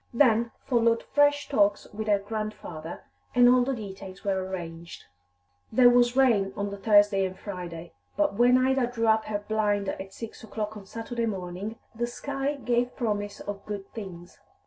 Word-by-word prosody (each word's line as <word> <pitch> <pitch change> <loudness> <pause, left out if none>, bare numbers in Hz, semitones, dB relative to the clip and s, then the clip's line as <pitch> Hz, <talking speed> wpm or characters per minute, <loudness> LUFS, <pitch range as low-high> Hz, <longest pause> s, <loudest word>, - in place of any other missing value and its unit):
Then 235 -3 +4 0.2
followed 230 -2 +2
fresh 290 0 +2
talks 205 -6 +2
with 215 +1 -5
her 205 -1 +4
grandfather, 200 -6 -6 0.3
and 245 0 +7
all 250 0 +6
the 265 +1 -1
details 195 -3 -9
were 190 -2 0
arranged. 170 -3 -7 0.7
There 245 +2 +7
was 240 0 +4
rain 215 -8 +3
on 200 0 -2
the 200 - -6
Thursday 205 -1 +4
and 185 0 -3
Friday, 175 -4 -7 0.2
but - - +2
when 245 +4 +5
Ida 260 -1 +2
drew 235 -2 -2
up 220 0 +3
her 205 -1 -4
blind 205 -2 +1
at 190 0 -6
six 225 +3 -9
o'clock 215 -1 -4
on 200 -2 -10
Saturday 230 +2 -3
morning, 195 +2 -5 0.2
the 240 +1 -2
sky 275 +3 -3
gave 245 -2 0
promise 205 -4 -2
of 200 -1 -6
good 200 -2 -6
things. 180 -5 -9
215 Hz, 170 wpm, -27 LUFS, 195-240 Hz, 0.7 s, and